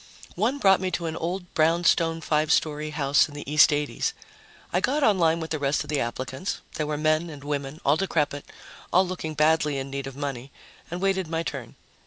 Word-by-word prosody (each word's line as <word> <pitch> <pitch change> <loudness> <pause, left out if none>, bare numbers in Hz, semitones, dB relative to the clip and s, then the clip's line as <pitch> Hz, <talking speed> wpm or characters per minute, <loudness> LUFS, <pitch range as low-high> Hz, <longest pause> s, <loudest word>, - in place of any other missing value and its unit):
One 230 +9 0
brought 195 -7 +4
me 185 - 0
to 170 - -6
an 160 -1 -3
old 180 +2 -4
brownstone 165 0 +2
five 155 -1 +1
story 155 0 +1
house 145 -2 +3
in 145 - -12
the 145 - -7
East 150 +1 +6
80s. 150 - -1 0.6
I - - +3
got 290 +3 +1
on 205 -7 +4
line 165 -1 +3
with 160 -1 -6
the 155 - -1
rest 145 0 0
of - - -8
the 145 - +1
applicants 130 +8 -3
there 150 - -2
were 150 -1 -2
men 155 +2 +1
and 145 -3 -10
women, 145 0 -4
all 140 +3 +4
decrepit, 150 -6 -1 0.5
all 185 +2 +5
looking 160 -4 -5
badly 150 -1 +2
in 135 0 -5
need 140 0 -4
of 135 - -8
money 140 -2 -5 0.4
and 175 +2 -5
waited 190 -2 +1
my 165 +1 -2
turn. 135 -7 -6
155 Hz, 210 wpm, -25 LUFS, 145-170 Hz, 0.6 s, East